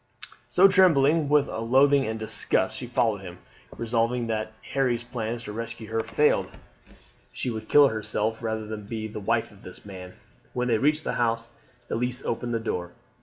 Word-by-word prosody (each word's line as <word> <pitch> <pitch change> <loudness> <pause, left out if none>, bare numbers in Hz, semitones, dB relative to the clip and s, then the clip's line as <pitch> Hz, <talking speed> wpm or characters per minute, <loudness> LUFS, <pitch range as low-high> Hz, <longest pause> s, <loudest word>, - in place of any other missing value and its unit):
So, 190 +2 +6
trembling 165 -6 +4
with 145 -1 +4
loathing 135 +5 +3
and 110 0 -3
disgust, 110 - +1
she - - -6
had - - -17
followed - - +2
him, - - -9 0.4
resolved 115 +1 0
that 110 -1 -1 0.2
if - - -13
Harry's 125 -3 +1
plan 120 -1 -4
to 115 -3 -8
rescue 115 0 -5
her 115 0 +1
failed 130 +7 +1 0.8
she 125 - -3
would 110 -1 -6
kill 145 -1 +7
herself 110 +1 -2
rather 110 -1 -3
than 105 -1 -7
be 110 -1 -4
the 105 0 -7
wife 115 +3 0
of 100 -1 -18
this 90 - -11
man. 90 -2 -9 0.4
When 125 0 -1
they 115 -2 +2
reached 150 +4 +2
the - - -2
house 115 -1 0 0.4
Elise 125 +2 -2
opened 120 0 -2
the - - 0
door. 90 -6 -4
115 Hz, 180 wpm, -26 LUFS, 110-130 Hz, 0.8 s, kill